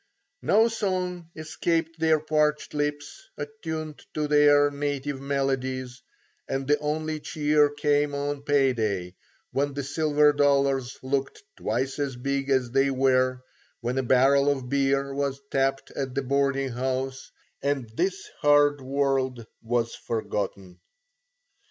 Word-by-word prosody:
No 220 +3 +4
song 185 -6 -2
escaped 165 +1 -2
their 160 -1 +3
parched 150 -1 0
lips, 145 - -3
attuned 160 - -6
to 150 -1 0
their 145 -1 +5
native 145 -1 -3
melodies, 130 -2 -2 0.5
and 135 0 -2
the 150 0 +3
only 155 +1 -2
cheer 150 -1 +2
came 145 0 +1
on 145 0 -2
pay 140 -2 +3
day, 100 -6 -2 0.4
when 140 0 -1
the 140 - -2
silver 150 +1 +3
dollars 140 -3 +2
looked 135 - -2
twice 130 +6 -2
as 140 -3 -2
big 135 +2 -2
as 130 -3 +1
they 135 +1 +3
were, 130 -1 +2 0.4
when 125 +2 -1
a - - +2
barrel 135 +3 +4
of 135 -3 -2
beer 140 0 +1
was 140 -1 -2
tapped 135 0 0
at 135 -2 -4
the 140 - 0
boarding 135 0 +1
house 130 +1 -3 0.3
and 140 -4 -1
this 190 +4 -1
hard 145 -1 +4
world 130 -3 0 0.2
was 115 0 -1
forgotten. 100 -4 -4
140 Hz, 130 wpm, -26 LUFS, 130-150 Hz, 0.5 s, their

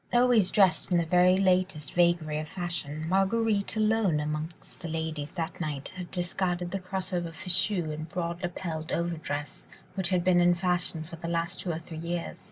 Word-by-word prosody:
Always 240 -5 +4
dressed 190 -2 +4
in 175 - +4
the 170 - +2
very 180 +2 +5
latest 185 -5 +1
vagary 170 -3 +2
of 155 0 -6
fashion, 165 -4 -3
Marguerite 200 +3 +1
alone 215 -6 +2
among 150 +1 -2 0.3
the 170 - -6
ladies 160 -2 -3
that 170 0 -4
night 145 -4 -3
had 180 -1 -6
discarded 175 -1 -1
the 195 - -2
cross 185 0 -4
over 175 -1 -1
fichu 180 0 +1
and 155 +1 -6
broad 170 0 -3
lapelled 170 -3 -4
over 170 0 -1
dress, 145 -1 -5 0.3
which 190 -3 +1
had 180 -2 +2
been 180 -1 +4
in 175 0 +5
fashion 175 -2 0
for 165 +1 -10
the 170 - -6
last 170 0 -1
two 180 - -2
or 160 - -2
three 165 -1 -8
years. 170 +1 -4
175 Hz, 185 wpm, -28 LUFS, 160-185 Hz, 0.3 s, very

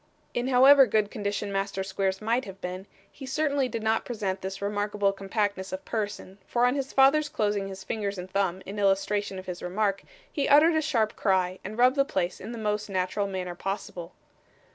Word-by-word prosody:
In 245 +1 -1
however 265 +1 +7
good 210 -1 +1
condition 205 -1 -3
Master 195 0 -2
Squeers 190 +1 -2
might 235 +4 +1
have 195 -1 -10
been, 185 +2 -6 0.2
he 270 - -10
certainly 280 -2 0
did 230 -2 -4
not 220 0 +1
present 200 -5 -3
this 190 0 -5
remarkable 205 0 0
compactness 195 -1 -2
of 185 0 -6
person, 205 -3 -4
for 240 0 +2
on 250 - +3
his 275 -1 -3
father's 290 +3 +4
closing 205 -4 -1
his 195 0 -8
finger 205 -2 -2
and 180 0 -6
thumb 190 -1 -1
in 205 +2 -6
illustration 195 0 +1
of 185 - -8
his 180 -1 -6
remark, 195 +2 -1 0.3
he 285 - 0
uttered 300 +4 +6
a 315 - +2
sharp 235 -8 0
cry, 185 -2 +1
and 210 +3 -7
rubbed 255 +3 +4
the 275 - +5
place 185 -9 -2
in 215 - -7
the 235 - -6
most 210 -1 -2
natural 190 +2 -1
manner 185 -2 -4
possible. 180 -2 -5
205 Hz, 195 wpm, -27 LUFS, 190-240 Hz, 0.3 s, however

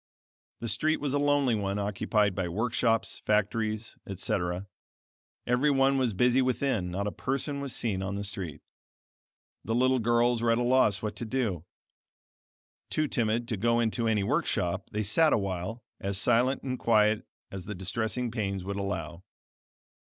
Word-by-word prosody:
The 115 - -3
street 155 +7 +1
was 140 -2 -2
a 145 - +2
lonely 145 -3 +3
one 100 -2 -1
occupied 105 0 +1
by 90 -2 -2
workshops, 115 +3 0
factories, 110 +1 -1
etc. 90 +2 -2 0.8
Every 125 +5 +2
one 135 -1 +3
was 120 -6 0
busy 125 +5 +4
within; 125 -7 0
not 95 +3 -2
a 105 - -1
person 140 +4 -3
was 140 -2 -2
seen 100 -5 -1
on 95 +1 -3
the 100 - -3
street. 95 -7 -3 1.0
The 115 - -1
little 130 +1 +3
girls 120 +1 +2
were 115 - +2
at 115 - +4
a 120 - +1
loss 125 -4 +3
what 105 -1 -3
to 120 - -4
do. 110 - -2 1.2
Too 155 0 0
timid 115 -2 0
to 110 - 0
go 115 +4 +2
into 115 0 0
any 105 -3 +2
workshop, 90 -2 -1
they 105 0 -2
sat 155 +10 +4
a - - +4
while, 100 +3 -4 0.2
as 100 0 -1
silent 120 +6 +2
and 130 -1 -3
quiet 105 -2 +3 0.2
as 95 -2 -7
the 105 - -5
distressing 110 +6 -1
pains 100 -5 -2
would 100 +1 -4
allow. 85 -4 -4
110 Hz, 165 wpm, -29 LUFS, 100-125 Hz, 1.2 s, busy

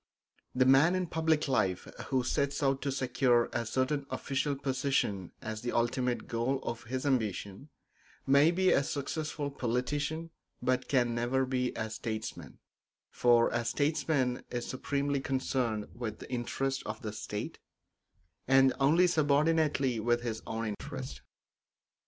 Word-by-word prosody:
The 130 0 +4
man 135 +7 +6
in 185 -1 0
public 160 -2 +1
life 95 -9 0 0.2
who 130 -2 +1
sets 140 +3 0
out 135 0 +2
to 140 - -1
secure 130 -2 +2
a 115 -1 -1
certain 135 +4 0
official 135 +2 -1
position 130 - -1
as 110 -1 -4
the 120 - -3
ultimate 125 +1 0
goal 120 +4 0
of 115 0 -5
his 130 +4 -3
ambition 110 -1 -1 0.6
may 140 +3 +6
be 185 +2 +3
a 140 - +4
successful 145 +1 -3
politician 145 +6 -2 0.3
but 130 0 0
can 120 -3 +2
never 120 +3 +1
be 125 -1 0
a 110 -1 -2
statesman; 110 0 -5 0.5
for 120 -1 +4
a 120 0 -1
statesman 145 -2 0
is 120 -1 -3
supremely 140 +2 -1
concerned 130 -5 -1
with 120 -2 -5
the - - -11
interests 135 +2 -1
of - - -5
the 105 -2 -4
state, 105 0 -5 0.9
and 135 0 +5
only 155 +6 +5
subordinately 150 -5 +2
with 120 +2 +1
his 115 -2 -3
own 115 0 -3
interests. 65 - -6
130 Hz, 140 wpm, -31 LUFS, 120-140 Hz, 0.9 s, man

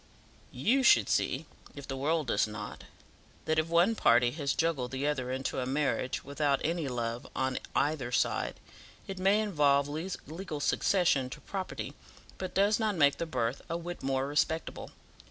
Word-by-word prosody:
"YOU 225 - +2
should - - +5
see, - - 0 0.3
if 140 -1 -9
the 135 - -3
world 155 +3 0
does 110 -3 +2
not, 105 -1 -7 0.6
that 155 0 +2
if 155 - 0
one 170 +6 +4
party 120 - +4
has 140 -1 -1
juggled 160 -7 0
the 135 +2 -3
other 130 -4 -1
into 130 0 -2
a 125 - -2
marriage, 135 -1 -1
without 140 0 0
any 165 -1 -1
love 120 -1 -3
on 130 0 0 0.2
either 145 -5 0
side, - - 0 0.5
it 190 -1 -6
may 195 +3 +4
involve 145 -9 +3
legal 160 +1 -5
succession 145 -4 +2
to - - -9
property, 190 -2 -5 0.5
but 185 - -5
does 205 +3 +3
not 215 -2 +1
make 145 -4 +4
the 170 - -3
birth 120 -5 -1
a 165 - -1
whit 175 +1 -6
more 135 0 0
respectable. 150 +3 -1
145 Hz, 165 wpm, -30 LUFS, 130-170 Hz, 0.6 s, should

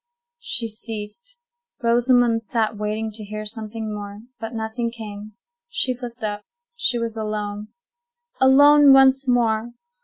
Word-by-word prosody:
She 235 - -1
ceased. 225 - -7 0.5
Rosamond 240 0 +3
sat 225 0 -1
waiting 215 +1 -3
to 215 0 -6
hear 215 +1 -6
something 220 0 -6
more; 205 0 -7 0.2
but 225 +1 -6
nothing 225 +1 -3
came. 215 -2 -9 0.4
She 260 - 0
looked 240 -1 -9
up; 205 -1 -3 0.3
she 245 - +1
was 230 -1 -3
alone. 210 -1 -4 0.7
Alone 285 +2 +7
once 270 0 +5
more! 235 -1 +1
225 Hz, 125 wpm, -22 LUFS, 215-245 Hz, 0.7 s, Alone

